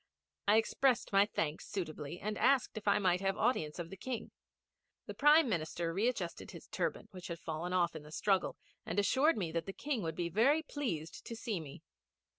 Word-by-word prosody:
I 210 +2 +6
expressed 240 +1 +2
my 200 +1 +6
thanks 160 -7 -2
suitably, 165 -4 -5
and 215 +1 -3
asked 265 +1 +3
if 215 -1 -7
I 200 - +5
might 180 -2 +2
have 195 +1 0
audience 185 -11 +1
of 170 -1 -5
the - - -6
King. 230 +3 -5 0.7
The - - -6
Prime 295 +1 +6
Minister 170 -3 -1
readjusted 200 -3 -1
his - - -11
turban, - - -2
which 185 -3 -8
had 170 - -4
fallen 165 +2 -4
off 175 -2 +2
in 155 - -6
the 150 +1 -13
struggle, 195 +2 +1 0.3
and - - -4
assured 265 +9 +3
me 175 -6 -2
that 165 +1 -2
the 195 - -4
King 275 -2 -2
would 160 -3 -3
be 170 0 -1
very 255 - +3
pleased 175 - -4
to 230 - -5
see 220 -4 -3
me. 145 -4 -10
195 Hz, 200 wpm, -34 LUFS, 165-230 Hz, 0.7 s, I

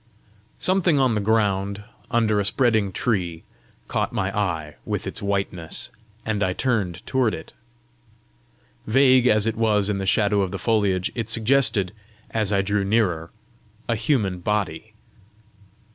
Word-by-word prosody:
Something 185 -4 +2
on 130 -3 +3
the 105 - 0
ground, 100 -2 0 0.3
under 110 -3 +2
a - - +1
spreading 110 -3 +2
tree, 90 -6 -2 0.4
caught - - -1
my 95 0 -2
eye 85 -7 -2
with - - -3
its - - -5
whiteness, 100 -4 -2 0.3
and 110 -2 -1
I 95 -2 +1
turned 100 -7 -1
toward 130 -5 +1
it. - - -11 1.3
Vague 130 +1 +5
as 110 -2 +4
it 115 -1 0
was 105 -3 +2
in 100 - -2
the 95 - -3
shadow 105 0 +3
of 95 - 0
the - - -4
foliage, 100 -5 +1
it 115 -2 -4
suggested, 115 -5 +2 0.4
as 110 -3 0
I 100 -1 +2
drew 100 +1 0
nearer, 95 -6 +1 0.6
a 115 - +1
human 110 -6 0
body. 105 +1 -2
105 Hz, 145 wpm, -23 LUFS, 95-115 Hz, 1.3 s, Vague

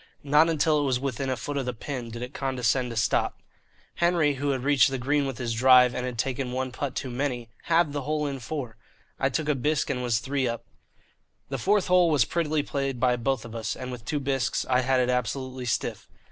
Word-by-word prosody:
Not 150 +3 +4
until 155 -1 +2
it - - 0
was 130 -2 +1
within 135 0 -2
a 130 - -1
foot 145 +5 -4
of 135 -2 -2
the 125 - -2
pin 125 0 -5
did 120 +1 -6
it 125 +3 -7
condescend 130 -2 0
to 115 - -6
stop. 110 - +1 0.6
Henry, 170 -4 +3
who 140 +1 -2
had 130 -2 -1
reached 140 -1 +4
the 135 - -2
green 140 +3 +1
with 135 -3 -5
his 120 -2 -2
drive 125 +1 +6
and 125 0 -3
had 125 -2 -5
taken 130 +1 -2
one 130 0 -2
putt 130 +1 -4
too 130 - -3
many, 125 -2 -2 0.2
halved 165 -3 +3
the 145 - -2
hole 150 +2 -1
in 140 -2 -3
four. 125 -2 -5 0.4
I 135 - +2
took 150 +3 -2
a 150 - +3
bisque 145 +3 0
and 125 - -2
was 120 -3 +1
three 135 +3 -1
up. 115 -1 -4 0.8
The 135 -1 -3
fourth 200 - +2
hole 180 -2 +4
was 145 -7 +3
prettily 155 -3 0
played 135 -3 -2
by 125 0 +3
both 125 0 -1
of 115 - -9
us, 110 -1 -3
and 130 0 -6
with 125 -2 -7
two 150 +5 -2
bisques 135 -2 -1
I 125 -1 +3
had 130 0 +2
it 125 0 +1
absolutely 125 +1 -2
stiff. 120 - -2
130 Hz, 230 wpm, -26 LUFS, 125-145 Hz, 0.8 s, drive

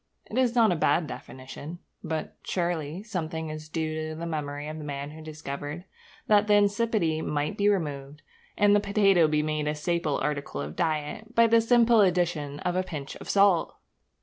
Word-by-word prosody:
It - - -5
is 250 -2 +2
not 230 -4 +5
a - - +2
bad 160 +1 +2
definition. 140 +4 -8 0.3
But, 160 -2 -4
surely, 170 -1 -2
something 160 -6 -4
is 155 0 -8
due 155 -1 -3
to 155 - -6
the 165 +2 -5
memory 145 -2 -4
of 155 +1 -6
the - - -7
man 140 0 -5
who 160 +1 -11
discovered 150 +1 -6 0.4
that 210 0 +4
the 210 - +5
insipidity 205 -5 +2
might 150 -1 -2
be 205 0 +3
removed, 145 -6 -2 0.3
and 205 0 +5
the - - +5
potato 200 -4 +4
be 150 0 +1
made 155 -1 -1
a 150 - 0
staple 155 -1 -1
article 140 - -3
of 70 +2 -5
diet, 160 +8 -2
by 230 - +6
the 230 0 +5
simple 235 -1 +5
addition 175 -6 +1
of 180 0 -1
a 185 - +2
pinch 150 -7 -6
of - - -11
salt! 200 -4 +3
160 Hz, 185 wpm, -27 LUFS, 150-200 Hz, 0.4 s, by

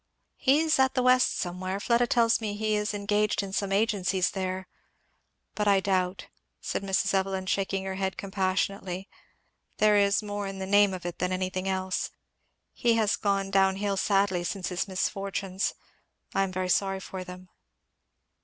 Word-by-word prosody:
"He 280 +3 +3
is 320 -3 +2
at 265 0 +3
the 255 - +2
West 255 0 +4
somewhere 185 +2 -3
Fleda 235 +3 +2
tells 230 -1 +3
me 210 -2 -3
he 215 0 0
is 210 0 -1
engaged 205 0 +1
in 195 -1 -7
some 195 0 -1
agencies 195 -3 +1
there; 185 -1 -3 0.9
but 210 -1 -1
I 200 -1 +5
doubt," 185 -1 -1 0.3
said - - -3
Mrs. 195 0 0
Evelyn 190 -1 0
shaking 195 0 -1
her 190 0 -3
head 190 0 -2
compassionately, 190 -1 -2 0.7
"there 210 -1 +4
is 200 +1 +3
more 205 -1 -4
in 195 0 -6
the 190 - -4
name 205 0 +4
of 180 - -9
it 175 -1 -5
than 180 +1 0
anything 185 +1 -2
else. 190 0 -1 0.6
He 235 -2 +2
has 215 -2 +2
gone 195 -1 -1
down 195 -1 +4
hill 200 0 -1
sadly 195 -2 +1
since 185 +1 -3
his 180 +1 -2
misfortunes. 195 0 -2 0.6
I - - +2
am 195 -1 0
very 185 0 -2
sorry 195 +1 +1
for 190 -1 -7
them." 180 0 -11
195 Hz, 170 wpm, -28 LUFS, 185-205 Hz, 0.9 s, I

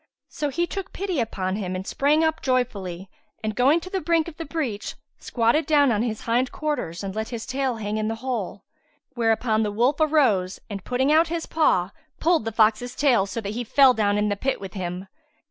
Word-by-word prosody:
So 295 - -3
he 340 +6 0
took 380 +1 -6
pity 375 -5 -2
upon 195 -4 -2
him 185 -3 -3
and 185 +1 -5
sprang 295 +7 +2
up 320 0 0
joyfully 200 -9 -1 0.4
and, 215 -1 -2
going 275 +7 +4
to 370 - -8
the 380 - -1
brink 330 0 +1
of 325 -2 -9
the 330 - -5
breach, 275 -10 -3 0.2
squatted 235 +7 +1
down 290 -4 +4
on 210 -2 +1
his 225 -3 -2
hind 245 +2 0
quarters 290 - -3
and 195 -1 -4
let 220 +1 -3
his 235 -2 -5
tail 260 -1 -1
hang 215 -1 -3
in 215 0 -1
the 225 - -2
hole; 220 -6 -3 0.5
whereupon 225 -2 +1
the 210 -1 0
wolf 245 +7 +2
arose 260 -13 +2
and 195 -2 -5
putting 260 +3 +1
out 320 +2 +5
his 330 0 -3
paw, 195 - +2 0.3
pulled 330 -7 +2
the 225 - -2
fox's 225 +3 +2
tail, 245 -9 +3
so 195 +3 -4
that 205 0 -4
he 240 +2 -3
fell 260 +2 +5
down 205 -3 +1
in 210 0 +1
the 205 - 0
pit 265 +7 -1
with 195 -2 -8
him. 180 -1 -4
235 Hz, 215 wpm, -24 LUFS, 205-295 Hz, 0.5 s, out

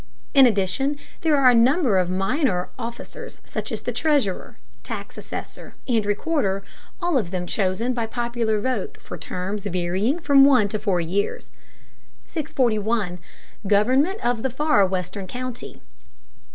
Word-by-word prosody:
In 270 -2 +8
addition 230 +7 0 0.2
there 310 -3 +3
are 260 -2 +6
a - - +3
number 245 - +4
of 180 -1 0
minor 195 - 0
officers 235 0 -7
such - - -5
as - - -4
the - - -2
treasurer, 285 - 0 0.2
tax - - -7
assessor, - - -8
and 230 -4 +2
recorder, 205 -3 0 0.4
all 345 -7 +2
of 195 -7 -3
them 180 -1 -3
chosen 200 +6 0
by 230 -2 -2
popular 235 -2 -1
vote 245 -3 -2
for - - -8
terms 195 +3 -4
varying 185 - 0
from 285 -5 +5
one 255 -7 +5
to 215 - -2
four 200 -4 +1
years. 185 +5 -2 0.7
641. 220 - -1 0.5
GOVERNMENT 260 - +2
OF 240 -2 +1
THE 265 - 0
FAR 260 -6 +3
WESTERN 185 +1 -4
COUNTY. 250 +2 -6
225 Hz, 140 wpm, -23 LUFS, 195-265 Hz, 0.7 s, In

